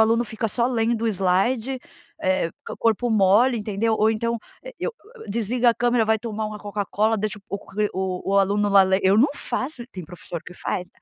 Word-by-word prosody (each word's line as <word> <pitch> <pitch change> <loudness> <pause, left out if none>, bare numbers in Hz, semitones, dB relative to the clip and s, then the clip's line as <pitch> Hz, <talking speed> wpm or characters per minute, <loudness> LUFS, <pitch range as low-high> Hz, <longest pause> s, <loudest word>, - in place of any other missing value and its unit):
aluno, 230 +2 +3
fica 220 0 -3
só 235 +3 +1
lendo 230 -2 0
o 230 - +2
slide, 220 +7 +1 0.4
eh, 185 -3 +1 0.3
corpo 230 +1 +1
mole, 220 +5 +4
entendeu, 215 +1 0
ou 220 0 +3
então, 230 +1 -1 0.3
eh, - - -9
eu 485 - -2 0.2
eu - - -11
desliga 235 +3 +2
a - - -2
câmera, 240 -1 +2
vai 220 0 +2
tomar 220 -1 -4
uma 210 0 -6
Coca-Cola, 210 +2 0
deixa 215 0 -3
o 200 - -3
q 210 +1 -2
o 190 +1 -2
o - - +6
aluno 205 +1 +2
lá 200 -1 +7
len 190 +1 +2
eu 190 +1 +4
não 260 +7 +5
faço, 255 0 -4
tem 185 -3 -7
professor 170 0 -8
que - - -11
faz. 180 0 -3
215 Hz, 200 wpm, -23 LUFS, 195-235 Hz, 0.4 s, lá